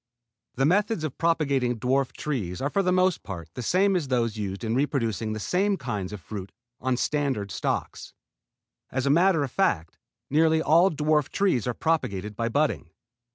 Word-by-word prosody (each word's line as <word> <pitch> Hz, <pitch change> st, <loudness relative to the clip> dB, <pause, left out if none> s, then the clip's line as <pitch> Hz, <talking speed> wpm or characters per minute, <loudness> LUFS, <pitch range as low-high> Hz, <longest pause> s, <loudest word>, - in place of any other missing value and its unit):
The 135 Hz, -, +2 dB
methods 200 Hz, +2 st, +2 dB
of 155 Hz, -4 st, -4 dB
propagating 140 Hz, -7 st, +1 dB
dwarf 130 Hz, +3 st, +1 dB
trees 105 Hz, -12 st, -3 dB
are 140 Hz, +2 st, -1 dB
for 200 Hz, -, +2 dB
the 180 Hz, -1 st, +1 dB
most 185 Hz, -1 st, +2 dB
part 85 Hz, -5 st, -8 dB
the -, -, -5 dB
same 190 Hz, -, +2 dB
as 165 Hz, -6 st, 0 dB
those 120 Hz, -4 st, 0 dB
used 100 Hz, -1 st, -4 dB
in 110 Hz, 0 st, -1 dB
reproducing 115 Hz, -6 st, 0 dB
the 110 Hz, -, -4 dB
same 195 Hz, -, +1 dB
kinds 105 Hz, -, -4 dB
of 105 Hz, -, -6 dB
fruit 100 Hz, 0 st, -7 dB, 0.3 s
on 130 Hz, -1 st, 0 dB
standard 135 Hz, -9 st, -1 dB
stocks. -, -, -3 dB, 0.8 s
As 130 Hz, 0 st, -1 dB
a 140 Hz, -, +3 dB
matter 170 Hz, 0 st, +4 dB
of 135 Hz, -, -4 dB
fact 85 Hz, -, 0 dB, 0.3 s
nearly 160 Hz, +2 st, +3 dB
all 165 Hz, +4 st, +5 dB
dwarf 150 Hz, -2 st, +1 dB
trees 185 Hz, -, +1 dB
are 120 Hz, -, -1 dB
propagated 105 Hz, -, -1 dB
by 115 Hz, +2 st, -1 dB
budding. 145 Hz, -, 0 dB
135 Hz, 175 wpm, -26 LUFS, 110-160 Hz, 0.8 s, all